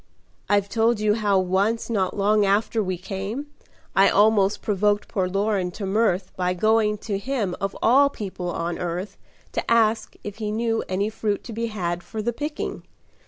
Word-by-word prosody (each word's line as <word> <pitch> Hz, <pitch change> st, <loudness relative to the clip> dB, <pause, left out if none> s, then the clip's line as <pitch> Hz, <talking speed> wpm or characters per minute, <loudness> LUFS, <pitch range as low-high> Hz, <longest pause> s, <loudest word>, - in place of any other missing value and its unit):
"I've 205 Hz, -1 st, +3 dB
told 225 Hz, +1 st, +2 dB
you 210 Hz, -1 st, +3 dB
how 210 Hz, -3 st, +2 dB
once 190 Hz, +5 st, +1 dB
not 195 Hz, -5 st, -1 dB
long 210 Hz, +1 st, +3 dB
after 205 Hz, +3 st, +2 dB
we 185 Hz, -3 st, -2 dB
came, 200 Hz, +10 st, -5 dB, 0.4 s
I 195 Hz, +1 st, +6 dB
almost 205 Hz, -1 st, +3 dB
provoked 205 Hz, 0 st, +1 dB
poor 190 Hz, -2 st, -1 dB
Loren 195 Hz, -1 st, 0 dB
to 205 Hz, +1 st, -5 dB
mirth 195 Hz, -2 st, +1 dB
By 180 Hz, 0 st, 0 dB
going 215 Hz, +2 st, +2 dB
to 200 Hz, -3 st, -1 dB
him 210 Hz, -6 st, -2 dB
of 195 Hz, 0 st, -2 dB
all 275 Hz, +5 st, +6 dB
people 190 Hz, -7 st, -5 dB
on 170 Hz, 0 st, -3 dB
earth 180 Hz, +3 st, -4 dB, 0.4 s
To -, -, -3 dB
ask 225 Hz, -1 st, +2 dB
if 205 Hz, 0 st, -7 dB
he 215 Hz, -2 st, -3 dB
knew 225 Hz, +1 st, 0 dB
any 200 Hz, +3 st, 0 dB
fruit 210 Hz, -2 st, -2 dB
to 235 Hz, -, -8 dB
be 230 Hz, +1 st, -2 dB
had 175 Hz, -5 st, -3 dB
For 175 Hz, +5 st, -7 dB
the 240 Hz, +2 st, -1 dB
picking. 295 Hz, +5 st, -4 dB
205 Hz, 175 wpm, -24 LUFS, 190-225 Hz, 0.4 s, I